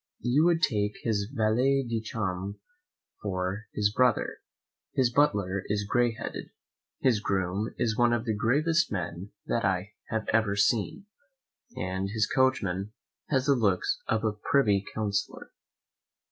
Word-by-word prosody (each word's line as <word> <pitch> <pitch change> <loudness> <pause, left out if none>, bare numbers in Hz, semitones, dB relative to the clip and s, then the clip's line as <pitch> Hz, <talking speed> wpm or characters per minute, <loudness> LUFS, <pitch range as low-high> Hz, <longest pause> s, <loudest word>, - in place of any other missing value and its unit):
You 135 +6 +3
would 170 0 +3
take 105 - +1
his 105 -3 0
valet 130 +3 +2
de 115 -1 -1
chambre 100 -3 -3 0.6
for 95 +2 -3
his 105 0 +1
brother, 125 -2 +2 0.6
his 125 -2 +2
butler 100 -9 +2
is 100 0 -1
gray 120 +1 +2
headed, - - -6 0.5
his 125 -5 +3
groom 95 +1 -1
is 110 -2 0
one 120 0 +3
of 120 0 0
the 110 - 0
gravest 145 +10 +2
men 90 0 -4
that 115 - 0
I 95 +1 0 0.2
have 110 -1 -2
ever 110 -2 +2
seen, 110 - +1 0.7
and 95 +1 -2
his 110 +1 +1
coachman 105 -7 0 0.4
has 130 -3 +1
the 140 - +5
looks 105 -8 +1
of 110 0 0
a 110 -2 +1
privy 105 -2 +2
counsellor. 100 -2 -3
110 Hz, 140 wpm, -28 LUFS, 100-120 Hz, 0.7 s, the